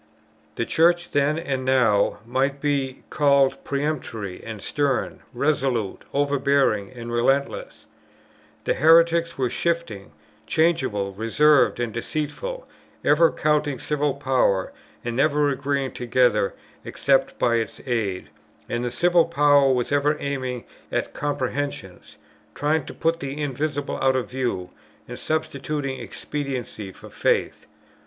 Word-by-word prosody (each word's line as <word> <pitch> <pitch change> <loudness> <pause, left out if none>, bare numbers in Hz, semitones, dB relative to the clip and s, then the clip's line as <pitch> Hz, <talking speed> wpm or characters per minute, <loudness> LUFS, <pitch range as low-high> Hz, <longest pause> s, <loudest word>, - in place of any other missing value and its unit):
The 115 - -1
Church 175 +4 +2
then, 145 +2 +2
as 140 -6 -2
now, 125 -6 +2
might 135 +4 0
be 140 -2 -1
called 140 -2 +3
peremptory 140 -9 -3
and 110 -2 -7
stern, 140 +3 -1
resolute, 130 -5 -1
overbearing, 140 -7 +1
and 120 -2 -8
relentless; 135 +4 0 0.8
and - - 0
heretics 170 +2 +4
were 130 -2 +1
shifting, 170 -13 -2 0.4
changeable, 130 -12 +1
reserved, 125 +10 +3
and 120 -3 -2
deceitful, 155 - -4 0.4
ever 160 +3 +5
courting 150 -2 0
civil 145 +1 -1
power, 130 -9 +1 0.3
and 120 -1 -2
never 145 +2 +3
agreeing 140 0 -1
together, 120 -4 +1 0.3
except 135 -1 +1
by 115 -1 +2
its 115 - -3
aid; 110 -7 -2 0.4
and 120 0 -2
the 120 - -1
civil 170 +7 +3
power 145 -4 +4
was 125 0 0
ever 145 +1 +2
aiming 130 -4 -3 0.3
at - - -2
comprehensions, 140 -8 -4 0.4
trying 150 0 0
to - - -8
put 165 +1 0
the 140 +2 -5
invisible 145 0 -2
out 130 0 +3
of 130 -1 -2
view, 120 -9 -2 0.4
and - - -8
substituting 145 -3 -2
expediency 125 -5 -5
for - - -14
faith. - - 0
140 Hz, 120 wpm, -24 LUFS, 120-150 Hz, 0.8 s, ever